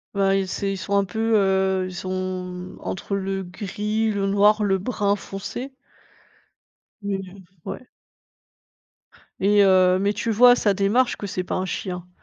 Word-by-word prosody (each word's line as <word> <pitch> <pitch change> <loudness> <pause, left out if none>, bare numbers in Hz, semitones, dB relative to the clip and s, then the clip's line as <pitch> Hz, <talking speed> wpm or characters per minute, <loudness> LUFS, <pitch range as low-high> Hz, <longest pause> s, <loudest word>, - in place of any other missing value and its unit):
Ben 195 -1 +2
ils 195 -1 +1
c'est 195 +1 -2
ils 195 - -3
sont 195 +2 -4
un 200 - +4
peu, 220 +4 -1
heu, 190 -2 +2
ils 185 - -9
sont, 185 +1 -6 0.4
mmh, 180 0 -8
entre 195 +1 -4
le 195 0 -3
gris, 210 +4 -2
le 200 -1 -1
noir, 205 +2 +4
le 195 -2 +2
brun 200 0 0
foncé? 240 +9 -7 1.3
Mais, 200 -1 -2
heu, 195 - -14 0.3
ouais. 255 - -7 1.5
Et 205 +1 +5
heu, 185 -1 +5
mais 200 +1 +1
tu 225 +3 -2
vois 245 +3 +7
à 245 - +6
sa 205 -4 +2
démarche 210 +6 +2
que 205 - -5
c'est 185 -1 -3
pas - - -3
un 185 - -1
chien, 180 -1 -5
195 Hz, 170 wpm, -23 LUFS, 190-210 Hz, 1.5 s, vois